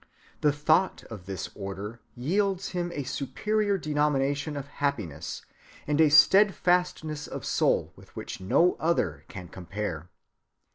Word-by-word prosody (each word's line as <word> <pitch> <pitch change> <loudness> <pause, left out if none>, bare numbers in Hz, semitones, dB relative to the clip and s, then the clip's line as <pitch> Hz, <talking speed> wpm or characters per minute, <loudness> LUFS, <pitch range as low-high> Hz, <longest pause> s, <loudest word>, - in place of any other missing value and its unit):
The 150 - +3
thought 155 +6 +2
of 100 -5 -9
this 95 -1 -5
order 100 +3 -6
yields 190 +8 0
him 175 -1 -2
a 145 -4 -3
superior 200 +10 -1
denomination 145 -2 0
of 140 - -4
happiness, 110 - -3 0.4
and 150 +1 +2
a 155 - +6
steadfastness 175 -3 +4
of - - -6
soul - - +1
with - - -18
which - - -6
no 170 - +3
other 155 - 0
can 90 -2 -8
compare. 90 -2 -5
145 Hz, 130 wpm, -27 LUFS, 105-175 Hz, 0.4 s, a